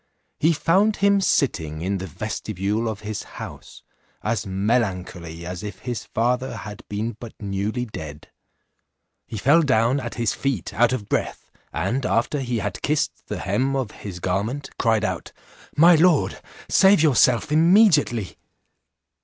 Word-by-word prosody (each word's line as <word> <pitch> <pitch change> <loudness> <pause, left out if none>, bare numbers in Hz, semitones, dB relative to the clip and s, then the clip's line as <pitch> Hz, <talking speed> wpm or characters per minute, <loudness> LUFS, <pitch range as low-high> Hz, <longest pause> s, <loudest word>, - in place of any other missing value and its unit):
He 160 - +4
found 190 +7 +2
him 200 0 +3
sitting 80 - 0
in 95 +2 -1
the 95 - -5
vestibule 105 +4 -3
of 105 -2 -6
his 105 0 -4 0.2
house, - - -9 0.4
as 110 -1 -1
melancholy 95 -5 -2
as 90 0 -5
if 100 -2 -7
his 120 -4 -4
father 125 +1 -1
had 105 0 -8
been 105 +2 -3
but 120 -2 -10
newly 105 +4 -2
dead. 75 -9 -9 1.0
He 110 - -6
fell 145 +10 +4
down 130 -2 +2
at 120 -3 -6
his 115 -3 0
feet 135 -1 -2
out 120 +1 +3
of 110 -6 -3
breath, - - -3 0.2
and 105 - -1
alter 125 +4 0
he 125 -3 -2
had 105 -3 -4
kissed 150 0 -1
the - - -4
hem 125 +8 0
of 130 -6 -2
his 95 -4 -8
garment, 100 +11 -2
cried 110 -2 +2
out, 95 -3 -4 0.4
"My 170 +4 +8
lord, 165 -2 +3 0.3
save 190 -4 +5
yourself 135 -1 +3
immediately." 160 - +4
115 Hz, 145 wpm, -23 LUFS, 100-140 Hz, 1.0 s, My